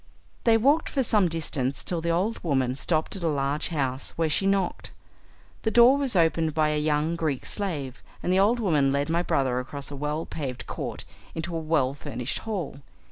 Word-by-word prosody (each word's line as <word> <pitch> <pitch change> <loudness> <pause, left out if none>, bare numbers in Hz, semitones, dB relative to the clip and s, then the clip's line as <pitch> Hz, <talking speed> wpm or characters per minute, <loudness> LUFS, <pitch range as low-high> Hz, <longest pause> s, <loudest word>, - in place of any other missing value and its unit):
They 225 -1 +6
walked 285 +8 +3
for 270 - 0
some 210 -6 +3
distance 145 -5 -2
till 170 -2 -1
the 170 - -2
old 185 +7 0
woman 130 -6 +1
stopped 155 +5 0
at 195 - -6
a 170 - 0
large 145 -1 0
house, 135 -5 -2
where 165 -1 +1
she 195 +6 +1
knocked. 195 -2 0 0.7
The 220 - +1
door 240 +4 +7
was 275 -6 +2
opened 165 -2 +2
by 155 -1 +3
a 150 0 0
young 150 +2 +1
Greek 155 -6 -2
slave, 150 -11 -4 0.2
and 180 - +1
the 190 - +4
old 220 +5 +3
woman 150 -10 +2
led 140 +2 0
my 170 +1 +2
brother 130 -7 +1
across 140 +3 -7
a - - -5
well 150 +3 -2
paved 135 -5 -5
court - - -5 0.3
into 165 +1 -4
a - - 0
well 155 -5 +1
furnished 125 -2 -4
hall. 175 -10 -3
160 Hz, 195 wpm, -26 LUFS, 140-185 Hz, 0.7 s, door